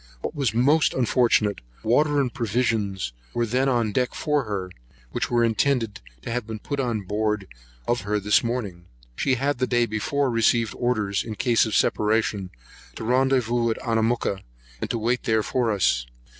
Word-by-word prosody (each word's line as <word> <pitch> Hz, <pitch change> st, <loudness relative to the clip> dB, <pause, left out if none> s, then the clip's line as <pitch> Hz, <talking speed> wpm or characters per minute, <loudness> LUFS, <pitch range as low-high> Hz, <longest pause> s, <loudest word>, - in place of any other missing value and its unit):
What -, -, -4 dB
was 140 Hz, -7 st, 0 dB
most 140 Hz, +7 st, +3 dB
unfortunate, 115 Hz, -, +2 dB, 0.2 s
water 145 Hz, +6 st, +3 dB
and 130 Hz, -4 st, 0 dB
provisions 110 Hz, -, -1 dB, 0.2 s
were 120 Hz, -, +1 dB
then 130 Hz, +4 st, +1 dB
on 120 Hz, -4 st, +1 dB
deck 125 Hz, +4 st, -1 dB
for 150 Hz, -4 st, 0 dB
her, 95 Hz, -4 st, -4 dB, 0.4 s
which -, -, -2 dB
were 120 Hz, -1 st, +2 dB
intended 115 Hz, -2 st, +1 dB, 0.2 s
to -, -, -5 dB
have 120 Hz, -2 st, -2 dB
been 110 Hz, -1 st, -5 dB
put 140 Hz, +6 st, -4 dB
on 120 Hz, -5 st, -1 dB
board 105 Hz, +1 st, -1 dB, 0.4 s
of 120 Hz, 0 st, +1 dB
her 105 Hz, +1 st, -2 dB
in 105 Hz, -, -1 dB
the 105 Hz, 0 st, +4 dB
morning. 105 Hz, -8 st, -3 dB, 0.3 s
She 130 Hz, -, +1 dB
had 135 Hz, +1 st, -1 dB
the 130 Hz, -, +1 dB
day 120 Hz, -1 st, +2 dB
before 130 Hz, +5 st, -1 dB
received 115 Hz, -1 st, +2 dB
orders, 105 Hz, -5 st, 0 dB
in 110 Hz, -2 st, -6 dB
case 115 Hz, 0 st, +2 dB
of 110 Hz, -, -2 dB
separation, 105 Hz, -3 st, +1 dB, 0.5 s
to -, -, -6 dB
rendezvous 120 Hz, -1 st, +2 dB
at 110 Hz, -, -1 dB
Anamooka, 115 Hz, -4 st, 0 dB, 0.4 s
and -, -, -3 dB
to -, -, -1 dB
wait 120 Hz, +3 st, 0 dB
there 110 Hz, -1 st, +2 dB
for 125 Hz, 0 st, 0 dB
us. 75 Hz, -, +1 dB
115 Hz, 175 wpm, -24 LUFS, 105-125 Hz, 0.5 s, the